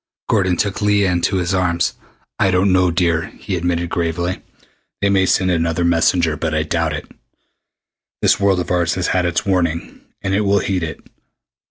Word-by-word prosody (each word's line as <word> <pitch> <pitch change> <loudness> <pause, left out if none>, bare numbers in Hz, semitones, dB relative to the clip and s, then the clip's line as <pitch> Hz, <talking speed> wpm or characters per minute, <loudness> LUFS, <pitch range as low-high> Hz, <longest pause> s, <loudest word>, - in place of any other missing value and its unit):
Gordon 95 -4 +1
took 100 +2 -1
Leah 105 -2 +2
into 90 +2 0
his 90 0 0
arms. 85 -2 +1 0.5
"I 100 -3 +3
don't 95 +1 +2
know, 90 -1 +3
dear," 85 -2 +1
he 95 - -6
admitted 85 0 -1
gravely. 85 +1 -2 0.6
"They 100 0 +1
may 95 -1 +3
send 95 0 +2
another 85 0 0
messenger, 85 -1 +2
but 75 +1 -2
I 75 - +1
doubt 80 0 -1
it. 75 - -6 1.1
This - - +3
world 100 -2 +2
of 90 0 -4
ours 85 -2 +1
has 90 -1 -1
had 90 -2 +1
its 85 - -1
warning, 85 -4 -1 0.2
and 95 - -1
it 100 - +2
will 100 -1 +2
heed 95 -2 -1
it. 80 -1 -5
90 Hz, 180 wpm, -19 LUFS, 85-95 Hz, 1.1 s, I